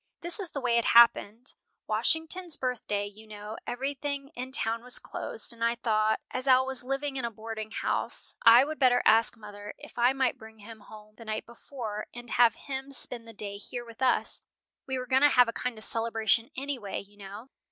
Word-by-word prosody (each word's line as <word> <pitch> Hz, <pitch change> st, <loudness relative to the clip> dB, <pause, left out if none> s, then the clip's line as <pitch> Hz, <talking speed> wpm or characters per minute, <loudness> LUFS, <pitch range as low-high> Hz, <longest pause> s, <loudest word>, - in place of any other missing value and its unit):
"This 345 Hz, +4 st, -1 dB
is 380 Hz, -4 st, -3 dB
the 280 Hz, -, -5 dB
way 235 Hz, -2 st, +2 dB
it 235 Hz, -, -3 dB
happened: 235 Hz, +1 st, +4 dB, 0.3 s
Washington's 325 Hz, +1 st, +2 dB
birthday, 225 Hz, -5 st, -2 dB
you 210 Hz, +2 st, -12 dB
know, 210 Hz, 0 st, -8 dB
everything 275 Hz, +2 st, -4 dB
in 255 Hz, 0 st, -7 dB
town 230 Hz, -3 st, +1 dB
was 250 Hz, +1 st, +1 dB
closed, -, -, -3 dB
and 230 Hz, 0 st, -7 dB
I 235 Hz, 0 st, +2 dB
thought, 220 Hz, -2 st, +1 dB
as 255 Hz, +2 st, -4 dB
Al 260 Hz, 0 st, +5 dB
was 265 Hz, -1 st, -2 dB
living 275 Hz, +2 st, -3 dB
in 260 Hz, -, -3 dB
a 235 Hz, -, -1 dB
boarding 220 Hz, 0 st, -7 dB
house, -, -, -3 dB
I 235 Hz, +3 st, +8 dB
would 310 Hz, +1 st, -6 dB
better 250 Hz, -2 st, +4 dB
ask 225 Hz, +1 st, +5 dB
mother 205 Hz, -1 st, -10 dB
if -, -, -11 dB
I 245 Hz, +2 st, +5 dB
might 265 Hz, -2 st, 0 dB
bring 220 Hz, 0 st, -13 dB
him 220 Hz, +1 st, -12 dB
home 215 Hz, 0 st, -14 dB
the 230 Hz, -, -11 dB
night 215 Hz, 0 st, -4 dB
before, 230 Hz, -3 st, -7 dB
and 240 Hz, -1 st, -8 dB
have 240 Hz, -2 st, +4 dB
him 270 Hz, 0 st, -6 dB
spend 245 Hz, -3 st, +2 dB
the -, -, -9 dB
day 200 Hz, -1 st, -6 dB
here 240 Hz, +4 st, -6 dB
with 230 Hz, +1 st, -14 dB
us; 260 Hz, -, +1 dB, 0.5 s
we 265 Hz, -1 st, -2 dB
were 255 Hz, -, -4 dB
going 260 Hz, +1 st, +2 dB
to 290 Hz, -, +7 dB
have 250 Hz, -3 st, +5 dB
a 230 Hz, -, -3 dB
kind 250 Hz, -1 st, -4 dB
of 215 Hz, -, 0 dB
celebration 225 Hz, 0 st, +2 dB
anyway, 265 Hz, -7 st, -4 dB
you 205 Hz, +1 st, -15 dB
know. 205 Hz, +5 st, -10 dB
235 Hz, 205 wpm, -28 LUFS, 220-265 Hz, 0.5 s, I